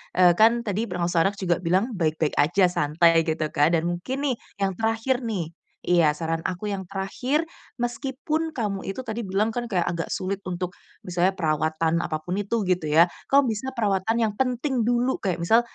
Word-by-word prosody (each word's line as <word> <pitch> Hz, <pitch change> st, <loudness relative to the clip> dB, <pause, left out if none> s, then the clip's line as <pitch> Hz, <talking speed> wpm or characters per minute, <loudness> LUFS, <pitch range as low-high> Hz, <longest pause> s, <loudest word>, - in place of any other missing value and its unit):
eee, 180 Hz, -1 st, +6 dB
kan 230 Hz, +2 st, +5 dB
tadi 215 Hz, +1 st, -2 dB
pengasuh 175 Hz, -2 st, 0 dB
anak 200 Hz, -, -3 dB
juga 180 Hz, -3 st, 0 dB
bilang 185 Hz, +7 st, +1 dB
baik-baik 160 Hz, -6 st, -1 dB
aja, 180 Hz, +5 st, +4 dB
santai, 165 Hz, +1 st, +3 dB
gitu 160 Hz, 0 st, 0 dB
kan, 150 Hz, +4 st, +3 dB
dan 160 Hz, -, +1 dB
mungkin 175 Hz, +11 st, -3 dB
nih, -, -, -1 dB, 0.3 s
yang 195 Hz, -, +2 dB
terakhir, 225 Hz, +3 st, 0 dB
nih. 180 Hz, -8 st, -3 dB, 0.3 s
Iya, 165 Hz, -4 st, +3 dB
saran 165 Hz, 0 st, -2 dB
aku 185 Hz, +3 st, -5 dB
yang 195 Hz, -, -3 dB
terakhir, 250 Hz, +11 st, -1 dB, 0.3 s
meskipun 275 Hz, +6 st, -2 dB
kamu 200 Hz, -5 st, -2 dB
itu 250 Hz, +7 st, -5 dB
tadi 225 Hz, +2 st, -3 dB
bilang 205 Hz, +2 st, 0 dB
kan, 240 Hz, 0 st, -3 dB
kayak 180 Hz, -5 st, +1 dB
agak 170 Hz, -1 st, -3 dB
sulit 195 Hz, +1 st, -3 dB
untuk 180 Hz, 0 st, -3 dB, 0.3 s
misalnya 180 Hz, +2 st, +1 dB
perawatan 160 Hz, +1 st, 0 dB
apapun 175 Hz, +5 st, -3 dB
itu, 210 Hz, +1 st, -1 dB
gitu 180 Hz, -4 st, 0 dB
ya, 160 Hz, +3 st, +6 dB, 0.2 s
kamu 275 Hz, -4 st, +4 dB
bisa 220 Hz, +5 st, -4 dB
perawatan 220 Hz, -3 st, 0 dB
yang 220 Hz, -3 st, +1 dB
penting 250 Hz, +2 st, 0 dB
dulu, 245 Hz, +3 st, +1 dB
kayak 185 Hz, -4 st, -1 dB
misal 195 Hz, +8 st, +4 dB
195 Hz, 180 wpm, -25 LUFS, 170-230 Hz, 0.3 s, eee